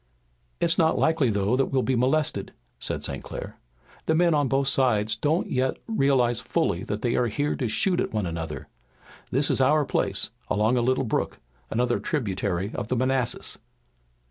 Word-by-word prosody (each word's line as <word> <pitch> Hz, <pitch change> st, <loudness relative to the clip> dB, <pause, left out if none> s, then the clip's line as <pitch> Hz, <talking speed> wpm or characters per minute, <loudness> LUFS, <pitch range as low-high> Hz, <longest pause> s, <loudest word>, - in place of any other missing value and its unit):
"It's 170 Hz, +1 st, +3 dB
not 160 Hz, -1 st, +3 dB
likely 160 Hz, -6 st, +2 dB
though 100 Hz, +2 st, +1 dB
that 135 Hz, +1 st, +2 dB
we'll 130 Hz, -2 st, 0 dB
be 130 Hz, -, +1 dB
molested," 135 Hz, +5 st, 0 dB, 0.3 s
said -, -, -3 dB
St. -, -, -3 dB
Clair. -, -, -8 dB, 0.5 s
"The 160 Hz, -, +3 dB
men 170 Hz, 0 st, +4 dB
on 145 Hz, -2 st, +2 dB
both 135 Hz, +2 st, +1 dB
sides 110 Hz, -6 st, +2 dB
don't 160 Hz, +3 st, 0 dB
yet 130 Hz, 0 st, 0 dB
realize 135 Hz, -, +2 dB
fully 125 Hz, -, 0 dB
that 105 Hz, +1 st, -4 dB
they 120 Hz, -1 st, +1 dB
are 125 Hz, -, +2 dB
here 145 Hz, +6 st, -1 dB
to 125 Hz, -5 st, -1 dB
shoot 180 Hz, -, +1 dB
at -, -, -1 dB
one 105 Hz, -3 st, -1 dB
another. 80 Hz, -2 st, -5 dB, 0.6 s
This 140 Hz, +3 st, +1 dB
is -, -, +2 dB
our 150 Hz, +3 st, +4 dB
place, -, -, 0 dB, 0.2 s
along 110 Hz, +4 st, +2 dB
a 125 Hz, -, +2 dB
little 130 Hz, +2 st, +1 dB
brook, 115 Hz, -, -1 dB, 0.3 s
another 120 Hz, +1 st, +1 dB
tributary 100 Hz, -, -2 dB
of -, -, -4 dB
the 130 Hz, -, 0 dB
Manassas." 130 Hz, 0 st, -1 dB
130 Hz, 175 wpm, -25 LUFS, 110-145 Hz, 0.6 s, men